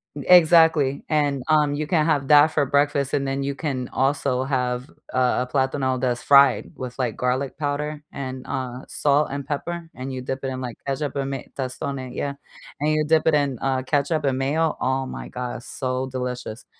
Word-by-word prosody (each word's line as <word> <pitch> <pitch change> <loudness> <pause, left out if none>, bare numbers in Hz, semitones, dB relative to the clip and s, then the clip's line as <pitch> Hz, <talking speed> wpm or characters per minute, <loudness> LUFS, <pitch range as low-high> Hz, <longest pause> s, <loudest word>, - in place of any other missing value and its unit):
Exactly, 160 -3 +5
and, 145 -4 +1
um, 150 -2 +3
you 150 +1 -2
can 155 -1 +2
have 145 -4 +1
that 150 0 +8
for 155 -2 0
breakfast, 140 0 +1
and 140 -1 0
then 135 0 -1
you 140 0 -2
can 135 -4 -3
also 135 -1 0
have 125 -1 -1 0.2
a 130 - +1 0.2
a 125 - -2
plátano 130 -1 0
that's 125 -2 -1
fried 140 -6 +5
with, 125 -1 -7
like, 125 -5 -1
garlic 130 +2 -1
powder 150 0 -2
and, 130 -2 -6
uh, 125 -1 -4
salt 145 +1 +2
and 140 0 -4
pepper, 165 +4 -4
and 130 +1 -6
you 130 -1 -5
dip 130 +1 -4
it - - -1
in, 130 -1 -4
like, 125 -2 -6
ketchup 140 +1 -2
and 135 -1 -2
may 135 -2 -5
Tostones, 130 -1 -4
yeah, 140 -1 -2 0.5
and 150 +2 +1
you 155 0 +2
dip 160 +1 +3
it 160 - +5
in, 140 -4 0
uh, 130 -1 0
ketchup 145 +3 0
and 135 -2 +1
mayo 155 +4 +1
oh 130 0 0
my - - -7
god, 125 -1 -5
it's 120 - -12
so 130 0 -2
delicious, 125 -3 -5
135 Hz, 195 wpm, -23 LUFS, 130-145 Hz, 0.5 s, that